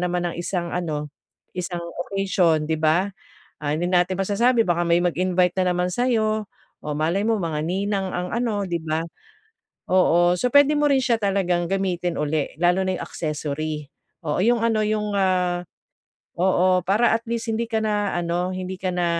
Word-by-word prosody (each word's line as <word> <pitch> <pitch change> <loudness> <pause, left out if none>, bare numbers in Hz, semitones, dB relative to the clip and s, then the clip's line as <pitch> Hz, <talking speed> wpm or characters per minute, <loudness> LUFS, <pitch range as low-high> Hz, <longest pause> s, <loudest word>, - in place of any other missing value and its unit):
naman 180 0 -1
ng - - -9
isang 175 -1 -3
ano, 150 -4 -3 0.4
isang 175 -1 -4 0.3
occasion, 185 -5 +1
'di 160 0 -2
ba? 170 +6 +2 0.5
Ah, 145 - -1
hindi 165 +4 0
natin 180 +1 +1
masasabi 225 +3 +2
baka 175 0 +2
may 170 0 +3
mag 175 -1 0
invite 180 0 +2
na 180 -1 +2
naman 180 0 0
sa'yo, 220 -3 0 0.3
o 150 - -4
malay 165 +6 +1
mo 225 0 +2
mga 160 -4 -2
ninang 195 +2 -1
ang 180 0 -3
ano, 225 -4 -1
'di 170 -3 -3
ba? 160 +1 -2 0.8
Oo. 175 -1 +4
So, 250 +7 -1
pwede 285 +2 +5
mo 295 - +1
rin 270 - +4
siya 250 -2 +2
talagang 195 -5 0
gamitin 180 -3 -1
ulit, 150 0 -2
lalo 180 +2 +3
na 185 -1 -1
yung - - -4
accessory. 150 -1 -4 0.4
Oo, 150 +5 +1
yung 235 +1 +3
ano, 225 -1 +1
yung, 210 -1 -1
ah, 180 -2 +1 0.7
oo, 185 0 +2
para 215 +4 +3
at 230 - -10
least 235 -1 -3
hindi 225 +1 0
ka 225 -1 -1
na 210 -2 0
ano, 175 +1 -1
hindi 185 0 -5
ka 185 0 -3
na, 180 -1 0
180 Hz, 180 wpm, -23 LUFS, 175-205 Hz, 0.8 s, pwede